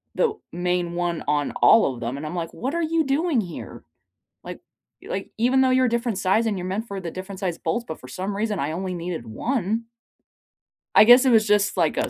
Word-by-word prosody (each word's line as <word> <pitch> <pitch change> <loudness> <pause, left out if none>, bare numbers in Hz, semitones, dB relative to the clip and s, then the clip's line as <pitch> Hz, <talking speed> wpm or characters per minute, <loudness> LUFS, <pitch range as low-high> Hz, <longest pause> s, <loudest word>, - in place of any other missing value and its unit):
the 465 -3 +2 0.2
main 175 0 -1
one 175 -1 -2
on 145 -1 0
all 220 -12 +6
of 120 - -10
them, 120 +2 -4
and 145 - -6
I'm 155 +3 -5
like, 165 -1 -4
"What 265 +5 -4
are 340 - 0
you 325 0 +1
doing 280 -1 +1
here?" 175 -5 -9 0.6
Like - - -8 0.4
like, - - -5
even 250 +4 +2
though 260 - +4
you're 255 0 +3
a - - +1
different 235 -3 -1
size 195 +5 +2
and 215 -3 -1
you're 180 - -5
meant 210 +5 -3
for 200 -2 -5
the 170 -2 -5
different 190 +2 -8
size 180 -4 -2
bolts, 235 - -2
but 160 - -6
for 130 - -12
some 190 +9 -4
reason 210 -1 -1
I 140 +2 -1
only 185 +3 -3
needed 170 -8 -5
one. 225 - -2 1.1
I - - +9
guess 245 +3 +8
it 260 - +4
was 220 -2 +4
just, 205 -1 +2
like, 165 -4 +1
a - - 0
195 Hz, 230 wpm, -23 LUFS, 175-235 Hz, 1.1 s, I